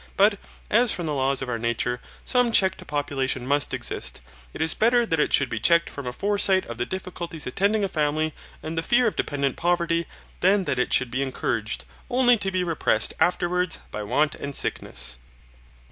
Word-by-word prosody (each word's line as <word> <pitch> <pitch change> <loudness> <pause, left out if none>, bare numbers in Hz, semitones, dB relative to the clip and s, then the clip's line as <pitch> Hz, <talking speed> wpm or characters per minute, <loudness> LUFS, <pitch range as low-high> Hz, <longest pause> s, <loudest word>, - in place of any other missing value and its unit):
But 205 0 +4 0.3
as 235 +1 +5
from 175 - -2
the 155 - -2
laws 135 -1 0
of - - -5
our 120 -2 -3
nature 120 +1 -1 0.2
some 245 -2 +2
check 190 -4 +4
to - - -11
population 140 -3 -2
must 140 +1 +1
exist, - - -2 0.3
it - - -10
is 160 0 +3
better 235 +2 +3
that 165 -7 0
it - - +1
should 140 - +3
be 110 - -4
checked 170 +7 +3
from 140 -3 -7
a - - -2
foresight 195 +4 +2
of 120 0 -8
the 120 - -1
difficulties 175 -4 -5
attending 200 +10 +1
a - - +1
family 155 -2 -1 0.3
and 160 +1 -5
the 165 - 0
fear 240 +8 +2
of 220 - 0
dependent 140 -2 -1
poverty 170 -1 0 0.3
than 195 +2 +3
that 140 -6 -1
it 125 - 0
should 130 -2 +2
be 130 - -1
encouraged, 115 -4 -2 0.2
only 245 -1 +5
to 195 -2 -1
be 185 -1 -1
repressed 160 -10 +1
afterwards 180 0 +1
by 105 - -5
want 145 +8 +1
and 140 -1 -6
sickness. - - -1
160 Hz, 195 wpm, -24 LUFS, 135-190 Hz, 0.3 s, as